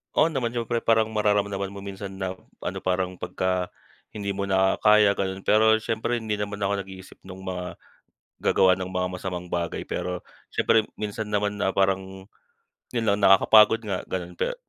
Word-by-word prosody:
Oo 165 +1 +4
naman, 120 -4 -2
siyempre. 120 0 -1
Parang 110 -1 +2
mararamdaman 100 -2 0
mo 100 0 -9
minsan 95 0 -7
na 95 -1 -4 0.3
ano - - -3
parang 90 0 -2
pagka 90 -1 -1 0.5
hindi 100 -1 -3
mo 100 0 -3
na 95 0 +2
kaya, 105 -1 +6
gano'n. 95 -1 -3
Pero 110 +1 +5
siyempre 115 +2 -1
hindi 105 -2 -2
naman 100 0 -3
ako 100 0 0
nag-iisip 95 0 -12
no'ng 95 0 -10
mga 90 -1 -4 0.8
gagawa 95 -1 +4
ng 95 0 -5
mga 90 0 -1
masamang 90 -1 -5
bagay. 85 -1 -3
Pero 90 -1 -3 0.3
siyempre 115 - +3 0.2
minsan 105 0 -4
naman 105 0 -1
na - - +2
parang, 95 0 -1 0.7
'yon 115 -2 -1
lang, 100 - +2
nakakapagod 105 +3 +6
nga, 100 -4 -4
gano'n. 90 -1 -5
Pe - - -1
100 Hz, 170 wpm, -25 LUFS, 95-105 Hz, 0.8 s, kaya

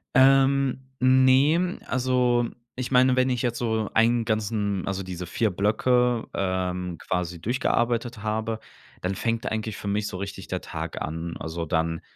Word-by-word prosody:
Ähm. 135 0 +4 0.2
Ne, 130 +7 +4
also 125 -1 +1 0.3
ich 130 0 -4
meine, 130 0 +4
wenn 130 0 +3
ich 125 -2 -1
jetzt 120 -1 -1
so 110 -2 0
einen 115 +1 +3
ganzen 105 -3 -1
also 95 0 -2
diese 90 -1 -6
4 110 +4 0
Blöcke, 120 +5 +2
ähm, 90 -2 -2
quasi 90 -1 -2
durchgearbeitet 120 +1 0
habe, 110 +1 -1 0.4
dann 90 +2 -1
fängt 115 +3 -2
eigentlich 110 -1 -3
für - - -7
mich 105 +1 0
so 95 - -5
richtig 100 0 -6
der - - -2
Tag - - -5
an. 80 +2 -4
Also, 85 +1 -4
dann, 80 0 0
110 Hz, 155 wpm, -25 LUFS, 95-125 Hz, 0.4 s, Ähm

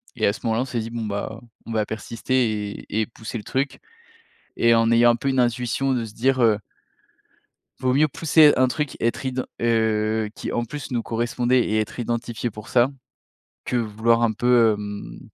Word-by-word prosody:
et 110 - 0
à 100 - +3
ce - - -9
moment-là, 115 +1 +1
on - - -5
s'est 120 -2 -3
dit: 115 0 -4
«bon 115 -1 -4
bah, 105 +2 -4 0.3
on 115 - -6
va 110 -1 +1
persister 110 -1 -2
et 110 - 0
et - - 0
pousser 115 +1 -7
le 105 - -7
truc», 135 +1 -2 0.8
et 115 0 +4
en 115 0 +3
ayant 120 +1 +6
un 120 - +1
peu 135 +4 -2
une 130 -1 +1
intuition 125 +2 +1
de 120 -2 -1
se 110 - -11
dire: 130 +3 +1
«Heu 110 -2 +4 1.2
vaut 130 -1 +1
mieux 155 +3 +4
pousser 155 0 +5
un 130 0 +4
truc, 150 +1 -3
être 115 +4 -1
iden 130 -1 -2 0.2
heu, 110 -2 +1
qui, - - -5
en 120 - 0
plus, 145 +4 -7
nous 120 -2 -1
correspondait 120 +2 +1
et 110 0 0
être 110 - -5
identifié 120 0 -3
pour 105 0 -11
ça», 125 +2 +3 0.8
que - - -2
vouloir 115 0 +1
un 115 - +3
peu, 120 0 +4
hem, 105 -12 -7
115 Hz, 200 wpm, -23 LUFS, 110-125 Hz, 1.2 s, ayant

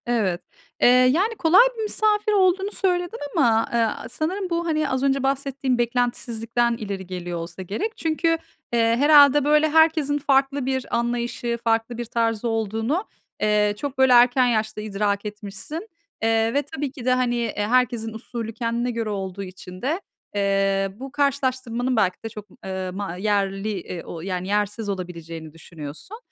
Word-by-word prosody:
Evet. 215 -8 0 0.4
Eee, - - +7
yani, 260 - +4
kolay 355 +1 +6 0.2
bir 445 - -2
misafir 425 0 +1
olduğunu 385 0 +3
söyledin 360 0 -1 0.2
ama, 230 -8 +3
eee, - - +2
a 225 0 -1
sanırım 360 +8 -3
bu 340 0 -1
hani 310 -3 0
az 260 0 -1
önce 275 -1 +2
bahsettiğin 270 -1 0
beklentisizlikten 235 -1 0
ileri 195 -4 -5
geliyor 175 -2 -5
olsa 170 +2 -7
gerek. 215 - -4
Çünkü, 325 +1 0 0.5
eee, 235 - +3 0.2
herhâlde, 290 0 +7
böyle, 300 +1 +4
herkesin 310 -2 +3
farklı 275 -1 +1
bir 260 -2 -1
anlayışı, 235 0 -2
farklı 225 +1 0
bir 240 - -3
tarzı 230 0 -1
olduğunu, 225 - -1 0.4
eee, 210 -1 +3
çok 285 +4 -5
böyle 265 -1 +5
erken 245 +1 +6
yaşta 215 -2 -1
idrak 205 -1 -1
etmişsin. 210 - -7 0.4
Eee, 225 0 +2
ve 285 - +2
tabii 275 -1 -3
ki 260 -4 -10
de, 255 - +4
hani, 250 -1 +1 0.2
e, 205 - -1
herkesin 240 -2 +1
usulü 225 0 -6
kendine 235 +1 -1
göre 230 -2 -3
olduğu 195 -1 -4
için 185 -1 -10
de, 315 +9 -1 0.3
eee, 195 -1 +1
bu 265 +4 -8
karşılaştırmanın 260 -3 0
belki 185 -5 +2
de 225 - -4
çok 210 -1 -10
m - - -19
eee, 190 -1 -4
ma 195 -3 -4
yerli, 195 +1 0
iii, 170 -1 -7
o 165 - -7
yani 185 0 -3
yersiz 210 +1 -1
olabileceğini 165 -4 -6
düşünüyorsun. 165 - -10
235 Hz, 160 wpm, -23 LUFS, 205-275 Hz, 0.5 s, Eee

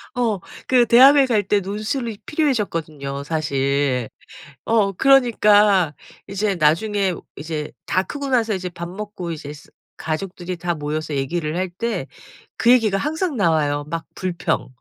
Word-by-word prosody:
어. 225 -6 0 0.3
그 250 -2 +4
대학을 270 +4 +7
갈 220 -4 +2
때 205 +1 +2
논술이 215 +3 -4
필요해졌거든요 165 - -2
사실. 140 -4 0 0.6
어 215 -3 +2
그러니까 210 - +4 0.3
이제 200 0 -1
나중에 185 +4 +1 0.2
이제 155 0 -5
다 185 - +1
크고 285 +4 -5
나서 230 -4 +1
이제 185 -1 -3
밥 170 0 -7
먹고 190 -3 -6
이제 150 -2 -7
쓰 145 - -15 0.3
가족들이 175 +2 -4
다 175 0 -2
모여서 150 0 -3
얘기를 150 +3 -2
할 185 0 -1
때 230 +6 -3 0.5
그 240 - +4
얘기가 220 -6 +4
항상 315 - -2
나와요. 150 -6 +1
막 165 -1 -4
불평 180 -3 -2
185 Hz, 280 characters per minute, -21 LUFS, 155-225 Hz, 0.6 s, 대학을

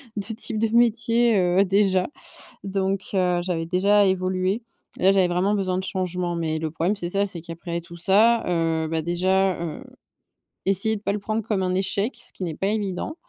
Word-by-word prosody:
2 215 +2 -4
types 220 -1 0
de 225 - +1
métier, 235 0 +3
heu, 180 +2 +3
déjà 190 -1 +2 0.6
donc, 195 0 -1
heu, 180 -2 +2
j'avais 175 -2 -2
déjà 200 +4 +3
évolué. 185 +3 0 0.4
Là 190 +1 +4
j'avais 190 -2 +3
vraiment 185 +4 +1
besoin 185 -2 -1
de 190 - -4
changement, 180 -2 -2
mais 160 -2 -2
le 160 - -2
problème 170 +6 -1
c'est 175 -4 -4
ça, 200 +2 +1
c'est 180 -4 -5
qu'après 170 +1 -5
tout 170 +1 -11
ça, 215 +6 +4
heu, 165 -2 0
ben, 160 0 -1
déjà, 185 +1 +1
heu, 165 -3 -5 0.8
essayer 200 +3 +1
de - - -13
pas 200 - -1
le 210 - -2
prendre 215 +2 -2
comme 200 -3 -1
un 185 0 0
échec, 200 +5 -1
ce - - -12
qui 185 - -7
n'est 165 - -3
pas 195 - -1
évident. 205 - -2
190 Hz, 195 wpm, -24 LUFS, 175-205 Hz, 0.8 s, Là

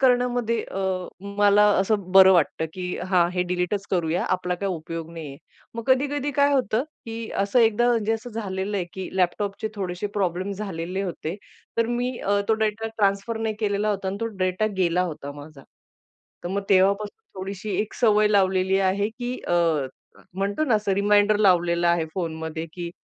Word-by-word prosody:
करण्यामध्ये 245 -3 +2
अ, 195 - -7 0.6
मला 205 0 +6
असं 195 -1 0
बरं 190 0 +9
वाटतं, 160 -1 +2
की 185 - -6 0.3
"हां, 180 -2 +4
हे 180 -1 +1
डिलीटच 180 +3 -1
करूया, 175 -1 0
आपला 180 -1 -1
काही 195 +1 -2
उपयोग 165 0 -6
नाहीये." 155 -5 -8 0.4
मग 230 - -4
कधी-कधी 285 +2 +1
काय 285 0 +4
होतं, 250 -1 +1 0.2
की 225 0 -6
असं 200 +5 +1
एकदा 230 +2 +3
म्हणजे 225 -2 +1
असं 225 +2 -4
झालेलं 205 -2 -3
आहे, 185 - -1
की 190 -1 -5
लॅपटॉपचे 195 +3 0
थोडेसे 185 0 -3
प्रॉब्लेम 190 0 -1
झालेले 190 -2 -4
होते, 175 -2 -4 0.4
तर 230 - +3
मी 245 +1 -2
अ, 200 0 +1
तो 220 - +4
डेटा 215 +1 -2
ट्रान्सफर 200 +3 +1
नाही 220 -1 -1
केलेला 205 0 0
होता 195 -2 -2
आणि 195 - -3
तो - - +1
डेटा 185 +3 +1
गेला 180 0 +2
होता 145 -1 -8
माझा. 145 0 -12 0.8
तर 175 - -2
मग 200 +2 -2
तेव्हापासून 200 - +1
थोडीशी 195 +1 -4
एक 210 - -4
सवय 215 -3 +4
लावलेली 190 -2 +2
आहे, 200 +2 0
की 245 +2 -5
अ, - - 0 0.8
म्हणतो 200 +9 -1
ना, 255 -7 +2
असं 210 -2 +1
रिमाइंडर 205 +1 +4
लावलेला 175 -3 +3
आहे 170 -2 +1
फोनमध्ये, 160 -2 -4
की 175 -1 -5
200 Hz, 170 wpm, -24 LUFS, 180-220 Hz, 0.8 s, बरं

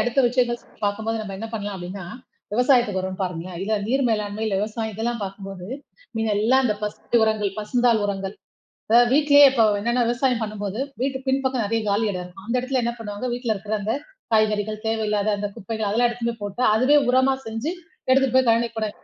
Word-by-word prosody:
அடுத்த 245 +4 +2
விஷயங்கள் 240 -1 +1 0.3
பார்க்கும்போது 220 +2 -1
நம்ம 200 -2 -6
என்ன 225 - -4
பண்ணலாம்? 205 -2 -4
அப்பிடின்னா, 185 +1 -7 0.5
விவசாயத்துக்கு 240 -4 +3
வருவோம் 185 0 -4
பாருங்களே! 180 0 -4
இல்ல 210 +3 -2
நீர் 270 +3 +1
மேலாண்மை, 210 -1 -1
இல்ல 210 - -1
விவசாயம் 220 +1 -3
இதெல்லாம் 235 +2 -2
பார்க்கும்போது, 195 -2 -8 0.5
மீதம் 220 -2 0
எல்லாம் 260 +4 +4
அந்தப் 210 -4 0
ஃபர்ஸ்டு 210 +3 -1
உரங்கள், 215 -2 +1
பசுந்தாள் 235 +1 +2
உரங்கள், 195 -1 -3 0.6
இத 230 +2 +7
வீட்லே 290 0 +6
இப்ப 240 -4 +3 0.2
என்னன்னா 235 +4 +1
விவசாயம் 245 0 +1
பண்ணும்போது, 210 0 -4 0.2
வீட்டு 265 0 0
பின்பக்கம் 265 -2 +1
நிறைய 225 +2 0
காலி 205 +2 +2
இடம் 180 -2 -4
இருக்கும். 185 +2 -13
அந்த 235 - -1
இடத்துல 255 0 -1
என்ன 235 - 0
பண்ணுவாங்க, 205 +1 -5
வீட்ல 240 -2 -2
இருக்கிற 205 +2 -3
அந்தக் 220 +8 -2 0.3
காய்கறிகள், 215 0 +2
தேவை 220 0 0
இல்லாத 210 0 +1
அந்தக் 200 0 -4
குப்பைகள் 220 +1 -3
அதெல்லாம் 240 +4 +3
எடுத்துட்டும் 235 -1 -3
போய் 205 -1 -4
போட்டு 250 - -1
அதுவே 255 +7 +5
உரமா 260 +1 +4
செஞ்சு, 225 +8 -3 0.4
எடுத்துட்டு 260 -1 +3
போய் 260 -1 +4
கழனிக்கு 230 0 +1
போட 215 -1 -1
220 Hz, 185 wpm, -23 LUFS, 205-245 Hz, 0.6 s, இத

